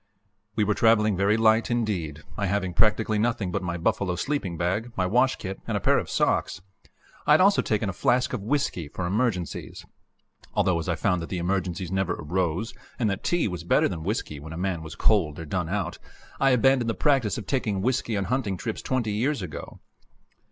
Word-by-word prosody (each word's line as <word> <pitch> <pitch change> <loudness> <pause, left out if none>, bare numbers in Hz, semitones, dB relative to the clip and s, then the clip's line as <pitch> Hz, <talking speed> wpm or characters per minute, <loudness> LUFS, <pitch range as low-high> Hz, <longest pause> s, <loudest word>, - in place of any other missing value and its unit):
We 105 - +2
were 105 +1 +2
traveling 110 -2 +4
very 100 +4 +2
light 110 0 +4
indeed, 95 -11 -2
I 100 -2 -1
having 95 -2 -1
practically 110 +1 +2
nothing 110 -4 0
but - - -1
my 85 -1 -3
buffalo 90 +2 0
sleeping 100 - -2
bag, 95 +8 -1
my 95 - +2
wash 125 +7 +3
kit, 95 0 -6
and - - 0
a - - -1
pair - - +3
of - - -6
socks. - - +1 0.7
I 150 - +7
had 155 - +6
also 200 +1 +5
taken 105 -1 0
a 95 - -2
flask 125 +8 +1
of 125 - -2
whisky 110 - -1
for 90 +5 -5
emergencies 95 - -2 0.7
although, 90 -3 +2
as 85 - -4
I 85 - +1
found 90 -2 0
that 85 - -6
the 95 - -3
emergencies 90 0 -2
never 95 -2 0
arose 90 +6 -2 0.2
and 115 -5 +1
that 100 - -4
tea 175 -7 +1
was 90 -4 -5
better 85 - +3
than 85 -4 -5
whisky 80 -5 -3
when 80 +3 -8
a - - -6
man 90 -2 -2
was 80 -1 -8
cold 85 -9 +2
or 80 - -6
done 85 +1 -2
out, 100 0 -2 0.4
I 135 - +4
abandoned 125 -1 +3
the 115 - -1
practice 130 -9 +2
of - - -6
taking 105 -8 -1
whisky 120 -3 0
on 100 - 0
hunting 110 -4 -1
trips 110 +4 -4
twenty 125 -5 -1
years 115 +3 0
ago. 80 -4 -8
100 Hz, 205 wpm, -26 LUFS, 90-115 Hz, 0.7 s, I